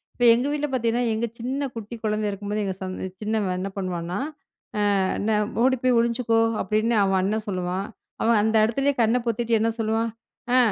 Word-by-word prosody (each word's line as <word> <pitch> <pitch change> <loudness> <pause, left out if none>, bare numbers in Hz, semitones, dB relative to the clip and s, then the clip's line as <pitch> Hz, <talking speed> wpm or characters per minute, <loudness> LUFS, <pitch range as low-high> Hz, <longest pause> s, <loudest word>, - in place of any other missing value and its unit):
இப்ப 245 - +2
எங்க 245 +4 +1
வீட்ல 295 0 -1
பார்த்தீங்கன்னா, 240 -1 +1
எங்க 220 +2 0
சின்ன 260 +4 -2
குட்டி 225 +1 -6
குழந்தை 215 -1 0
இருக்கும்போது 205 +1 -3
எங்க 190 -1 -2
சந்த 185 0 -4
சின்னவன் 210 -4 0
என்ன 195 +2 -3
பண்வான்னா? 180 -1 -3 0.8
அ - - +2 0.2
என்ன 210 0 +1 0.2
ஓடி 260 +1 +4
போய் 250 -2 +4
ஒளிஞ்சுக்கோ 235 -1 +2 0.2
அப்டின்னு 220 +2 +1
அவன் 195 -1 +2
அண்ணன் 215 +3 -1
சொல்லுவான். 185 +1 -2 0.4
அவன் 230 -1 +4
அந்த 220 +1 +1
இடத்திலேயே 275 +5 +1
கண்ண 225 +2 +3
பொத்திகிட்டு 230 0 +1
என்ன 225 +1 +2
சொல்லுவான். 225 +1 0 0.4
அ - - +6
220 Hz, 175 wpm, -24 LUFS, 200-235 Hz, 0.8 s, அ